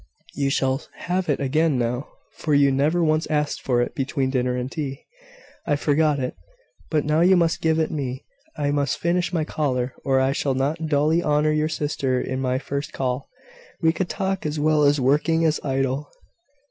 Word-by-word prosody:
You 140 -1 0
shall 135 0 +1
have 180 -1 -2
it 145 - +1
again 150 +1 +1
now, 125 +3 -1 0.2
for 150 -2 -1
you 140 -1 +5
never 150 +6 +2
once 155 0 +1
asked 150 -1 0
for 120 -2 +1
it - - -5
between 135 -2 -1
dinner 125 -1 0
and 125 +1 -3
tea." 135 -3 -5 0.6
"I 145 - +3
forgot 150 +1 +2
it: 130 -2 -3 0.5
but 155 -3 +1
now 150 +2 +2
you 185 +2 +5
must 170 -1 +1
give 160 -1 +2
it 160 -1 0
me. 135 -3 -4 0.3
I 145 -1 0
must 140 -2 0
finish 175 +1 0
my 165 -3 0
collar, 130 -5 -1
or 135 -1 +2
I 130 0 +2
shall 135 -1 -1
not 150 +5 -1
duly 155 +3 +2
honour 150 -1 +2
your 155 0 +1
sister 140 -4 -1
in 130 +1 -3
my 130 -1 0
first 140 +1 -4
call. 130 0 -2 0.5
We 160 -1 +3
can 185 +1 -2
talk 190 0 -2
as 150 0 -2
well 150 -1 +4
working 150 +5 +2
as 155 -1 +2
idle." 135 +1 -1
145 Hz, 185 wpm, -23 LUFS, 135-155 Hz, 0.6 s, you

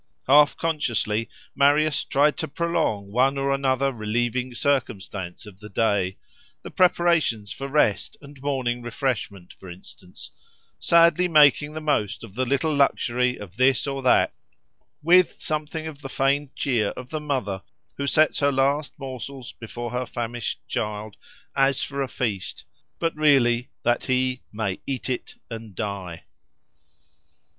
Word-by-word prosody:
Half 145 +2 +6
consciously 115 -8 -1 0.2
Marius 145 +1 +3
tried 145 +2 +2
to 160 - -2
prolong 155 -11 -1
one 130 +5 +2
or 140 0 0
another 135 0 +1
relieving 120 +3 -1
circumstance 100 -9 -2
of 100 -2 -13
the 105 0 -10
day, 100 -3 0 0.5
the - - -8
preparations 170 - +2
for 135 - -5
rest 140 -8 +1
and 140 -2 -14
morning 130 -4 -1
refreshment, 115 -6 -3
for 95 - -13
instance; 90 +1 -11 0.5
sadly 170 +1 +4
making 150 -2 +5
the 155 - -5
most 140 -11 0
of 110 -4 -11
the 130 +3 -1
little 140 +4 +1
luxury 125 -3 +2
of 100 -1 -11
this 130 0 +3
or 135 -1 -3
that, 130 - +3 0.7
with 180 +2 +4
something 155 +1 -3
of 150 -3 -8
the 135 - -7
feigned 140 +1 0
cheer 120 -6 +1
of 125 0 -8
the 155 -1 -3
mother 125 -10 -2 0.4
who 140 - -2
sets 155 +1 +3
her 140 0 +3
last 140 +2 0
morsels 130 -1 -7
before 120 +1 -7
her 125 0 -2
famished 120 -1 -4
child 105 0 -3 0.4
as 135 -1 +2
for 140 -1 -3
a 135 - -1
feast, 110 -7 -3 0.3
but 165 -1 -1
really 135 -5 +3
that 120 0 +1
he 130 -1 0
"may 105 -3 -3
eat 130 -1 -3
it 125 - -5 0.2
and 110 -3 -8
die." 95 -5 -5
130 Hz, 145 wpm, -24 LUFS, 110-145 Hz, 0.7 s, Half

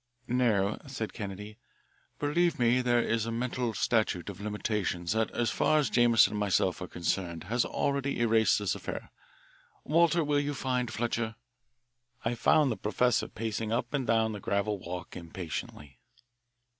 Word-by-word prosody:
"No," 110 -5 +1
said 120 -5 -4
Kennedy, 105 0 -7 0.6
"believe 170 +4 +1
me, 120 +1 +3
there 120 -1 +2
is 115 0 0
a - - -2
mental 120 -1 -2
statute 105 -4 0
of 100 - -12
limitations 105 -4 -2
that 110 0 +1
as 120 - -1
far 155 - +2
as 150 - +1
Jameson 115 -4 +5
and 105 - -2
myself 100 -4 +1
are - - -4
concerned 85 -1 -2
has 115 +7 0
already 140 -1 -1
erased 115 -1 +4
this 100 -3 0
affair. - - -6 0.7
Walter, 170 +1 +3
will 145 -1 +2
you 145 0 -2
find 125 -3 -1
Fletcher?" 115 -1 -2 0.9
I 115 - +1
found 145 +3 +3
the 110 - -3
professor 125 +3 +1
pacing 110 0 -3
up 120 +2 -1
and 135 -4 -1
down 110 -1 +2
the 105 - -5
gravel 100 +1 -1
walk 90 0 -7
impatiently. 80 -5 -7
115 Hz, 155 wpm, -30 LUFS, 105-125 Hz, 0.9 s, Jameson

